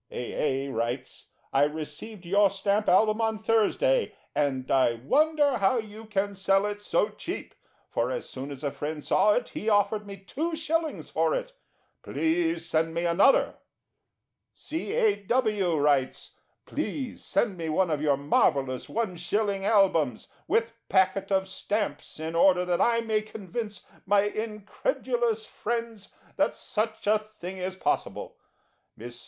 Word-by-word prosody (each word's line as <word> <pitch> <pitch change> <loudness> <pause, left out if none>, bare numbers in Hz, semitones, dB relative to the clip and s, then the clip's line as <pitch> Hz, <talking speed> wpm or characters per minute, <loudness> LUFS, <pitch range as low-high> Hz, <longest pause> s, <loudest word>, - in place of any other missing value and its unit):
A. 135 +2 -2
A. 140 - -5
writes: 120 +2 -3 0.3
"I 135 - +4
received 160 +6 -6
your 200 +3 +4
Stamp 200 +2 0
Album 215 +4 +4
on 220 -1 +1
Thursday, 225 - +2 0.2
and 135 -3 -1
I 130 -3 +4
wonder 285 - +2
how 200 +5 +3
you 220 0 -6
can 205 -1 -1
sell 195 +1 +2
it 205 0 -3
so 205 0 +1
cheap; 335 - -6 0.3
for - - -1
as - - -3
soon 135 +2 -6
as 140 0 -8
a 140 - 0
friend 150 +1 -5
saw 210 - +4
it 245 - -1
he 220 - -3
offered 205 0 +2
me 200 0 -7
2/ 315 - -2
for - - +2
it. - - -4 0.5
Please 330 - 0
send 165 0 0
me 170 +1 0
another." 180 +11 +4 1.0
C. 320 +6 -4
A. 450 -3 +3
W. 210 -6 +1
writes: 145 -3 +1 0.3
"Please 265 -5 -4
send 210 -5 +1
me 165 -2 -4
one 170 +2 +2
of 150 -1 0
your 145 -2 +2
marvellous 135 -2 +1
1/ 200 -1 -1
Albums, 190 - +2 0.2
with 230 0 +1 0.2
packet 190 +1 +2
of 190 0 +2
stamps, 205 -2 -3
in 160 +1 -4
order 180 +1 +4
that 175 -1 +1
I 230 -1 +3
may 220 -2 0
convince 215 0 -6 0.2
my 200 +1 +5
incredulous 220 - -2
friends 230 -2 -4 0.3
that - - +2
such 220 +1 -3
a 210 +1 +4
thing 190 -3 -9
is 185 +1 -3
possible." 190 - -2 0.6
Miss 120 +1 -8
M. - - -6
205 Hz, 150 wpm, -27 LUFS, 165-225 Hz, 1.0 s, my